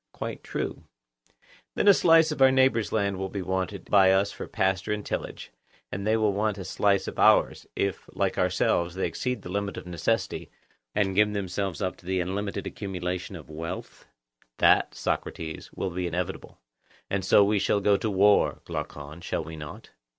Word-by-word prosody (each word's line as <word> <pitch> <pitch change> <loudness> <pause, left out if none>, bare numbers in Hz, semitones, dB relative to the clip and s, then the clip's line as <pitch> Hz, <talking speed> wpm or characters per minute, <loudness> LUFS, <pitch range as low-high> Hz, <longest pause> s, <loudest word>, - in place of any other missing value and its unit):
Quite - - -5
true. - - -4 0.9
Then - - +1
a 200 - +10
slice 165 -3 +5
of 150 - -4
our 135 - +8
neighbours' 130 -5 +3
land 100 -3 0
will 95 0 -3
be 100 -1 -4
wanted 95 +1 -3
by 95 -2 +5
us 95 +1 +2
for - - -7
pasture 95 +1 0
and 105 -1 -2
tillage, - - -5 0.4
and 100 +2 -4
they 110 +1 +3
will 105 -2 +2
want 105 0 0
a 95 - -6
slice 100 0 +1
of - - -6
ours, - - +4
if, 100 -1 -2
like - - -1
ourselves, 85 0 +1
they 95 - -1
exceed 125 -4 -3
the - - -8
limit 100 +1 -2
of - - -7
necessity, 90 +6 -2 0.5
and 95 -2 +1
give 105 +2 +3
themselves 95 -1 -3
up 95 - -2
to 90 - -17
the 95 0 0
unlimited 95 +3 -3
accumulation 90 -1 -4
of 80 - -10
wealth? 80 +2 -7 0.5
That, - - +4
Socrates, 80 -1 -4
will 95 - -3
be 90 +1 -2
inevitable. 90 +2 -4 0.5
And 100 -1 -1
so 100 +2 +6
we 105 +1 +2
shall 100 - +2
go 100 0 +3
to 110 +2 -1
war, 100 +1 +3
Glaucon. 75 +3 -6
Shall 85 - -2
we 80 +1 -8
not? 75 -1 -9
95 Hz, 180 wpm, -27 LUFS, 90-105 Hz, 0.9 s, a